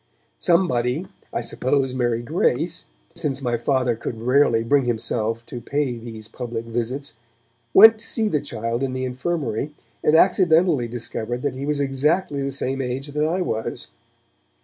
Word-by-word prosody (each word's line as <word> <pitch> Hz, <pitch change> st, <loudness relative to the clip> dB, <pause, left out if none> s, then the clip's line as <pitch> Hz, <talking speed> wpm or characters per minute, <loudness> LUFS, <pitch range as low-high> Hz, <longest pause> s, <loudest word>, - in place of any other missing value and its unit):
Somebody 165 Hz, -4 st, +2 dB, 0.3 s
(I -, -, -2 dB
suppose 135 Hz, 0 st, 0 dB
Mary 120 Hz, -2 st, 0 dB
Grace, 115 Hz, -, 0 dB, 0.3 s
since 135 Hz, -2 st, -2 dB
my 120 Hz, -2 st, +1 dB
Father 125 Hz, 0 st, +1 dB
could 110 Hz, 0 st, -5 dB
rarely 120 Hz, -1 st, +3 dB
bring 135 Hz, +3 st, +3 dB
himself 115 Hz, -1 st, -1 dB
to 120 Hz, -, -7 dB
pay 135 Hz, -1 st, -1 dB
these 110 Hz, -2 st, -9 dB
public 115 Hz, -2 st, -5 dB
visits) 120 Hz, +4 st, -3 dB, 0.6 s
went 220 Hz, -, +8 dB
to 225 Hz, -, -8 dB
see 225 Hz, -2 st, 0 dB
the 150 Hz, -8 st, 0 dB
child 115 Hz, -2 st, -3 dB
in 135 Hz, -1 st, -1 dB
the 130 Hz, 0 st, -2 dB
infirmary, 135 Hz, 0 st, -2 dB, 0.3 s
and 150 Hz, -, +4 dB
accidentally 170 Hz, -6 st, +4 dB
discovered 120 Hz, +1 st, -4 dB
that 145 Hz, -3 st, 0 dB
he 135 Hz, +2 st, -5 dB
was 150 Hz, -1 st, 0 dB
exactly 140 Hz, +3 st, 0 dB
the 140 Hz, 0 st, -2 dB
same 135 Hz, 0 st, -2 dB
age 130 Hz, +3 st, -3 dB
that 150 Hz, +1 st, -1 dB
I 180 Hz, +3 st, 0 dB
was. 110 Hz, -10 st, -3 dB
130 Hz, 155 wpm, -23 LUFS, 120-145 Hz, 0.6 s, went